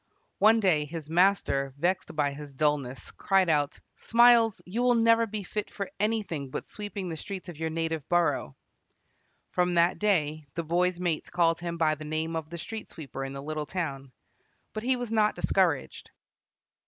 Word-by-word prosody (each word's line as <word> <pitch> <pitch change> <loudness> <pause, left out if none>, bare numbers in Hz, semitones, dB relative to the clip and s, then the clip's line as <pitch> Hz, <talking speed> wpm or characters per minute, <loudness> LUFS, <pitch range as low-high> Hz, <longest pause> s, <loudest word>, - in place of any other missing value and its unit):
One 220 +2 +6
day 170 -8 +2
his 155 0 -7
master, 165 -7 +2
vexed 175 +2 -1
by 145 -2 +1
his 145 -1 -10
dulness, 140 -3 -1
cried 190 -3 +2
out, 145 -2 +1 0.2
"Smiles, 235 -2 +5
you 210 +7 -3
will 245 0 +4
never 230 0 +4
be 210 -1 -5
fit 210 +3 -4
for 200 -2 -5
anything 205 -10 -1
but - - -5
sweeping 205 -2 -6
the 165 - -4
streets 190 +2 -7
of 170 - -9
your 160 0 -1
native 160 -2 -3
borough!" 175 -1 +1 1.0
From 180 0 +1
that 170 +1 +3
day 155 -7 +1
the 170 - -2
boy's 175 +2 +1
mates 175 -1 -2
called 170 -2 +2
him 170 0 -4
by 160 -2 +3
the 155 0 -7
name 155 +2 -2
of 160 -1 -4
the 170 - -7
street 220 +6 -7
sweeper 140 -4 -7
in 135 0 -5
the 140 0 -7
little 155 0 -4
town. 140 -6 -4 0.6
But 215 - -4
he 255 +3 +1
was 245 -2 -5
not 215 -1 +2
discouraged. 175 -7 0
170 Hz, 180 wpm, -28 LUFS, 155-200 Hz, 1.0 s, One